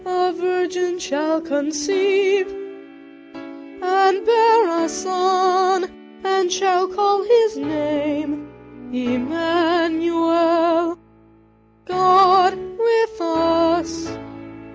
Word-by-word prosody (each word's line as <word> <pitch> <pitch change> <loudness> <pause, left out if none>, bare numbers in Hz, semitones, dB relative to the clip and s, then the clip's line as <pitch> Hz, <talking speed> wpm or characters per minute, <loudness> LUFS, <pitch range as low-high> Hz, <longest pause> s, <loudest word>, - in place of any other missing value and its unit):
a 365 0 -1
vir 360 +1 -2
gin 360 0 -3
shall 320 -2 -2
con 290 -2 -3
ceive, 385 +4 0
and 325 +1 -4
bear 450 -7 +3
a - - -4
son, 370 0 0 0.4
and 385 -2 0
shall 370 0 +1
call 405 +1 0
his 450 0 +3
name 295 0 -4 0.5
Em 250 +1 -3
man 330 0 0
u 335 0 -1
el; 335 0 +1 0.9
God 370 +1 +4
with 440 +3 -2
us. 330 0 0
360 Hz, 90 wpm, -19 LUFS, 325-380 Hz, 0.9 s, God